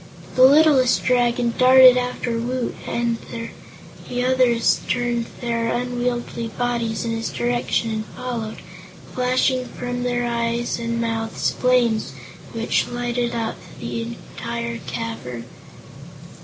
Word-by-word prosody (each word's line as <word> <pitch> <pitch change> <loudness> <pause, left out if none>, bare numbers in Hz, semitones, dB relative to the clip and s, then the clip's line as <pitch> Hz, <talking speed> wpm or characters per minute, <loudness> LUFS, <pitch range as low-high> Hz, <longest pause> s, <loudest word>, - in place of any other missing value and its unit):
The 255 - +2
littlest 280 -3 +5
Dragon 240 -1 +2
darted 255 0 +8
after 245 -2 -1
Woot 245 +1 -2
and 235 -1 -1 0.9
the 245 0 -1
others 255 -2 +3
turned 240 -2 0
their 230 -1 -1
unwieldy 240 -1 -2
bodies 235 0 -2
in 230 - -1
his 225 0 -2
direction 240 -1 -1
and 215 0 -3
followed, 235 -3 -4 0.6
flashing 255 0 +1
from 245 0 -5
their 245 0 0
eyes 235 0 -1
and 230 0 -2
mouths 225 -1 -1
flames 245 -3 +1 0.4
which - - 0
lighted 240 0 -2
up 225 -1 -2 0.2
the 230 - -4
entire 235 0 -5
cavern. 125 - -5
240 Hz, 115 wpm, -22 LUFS, 230-250 Hz, 0.9 s, darted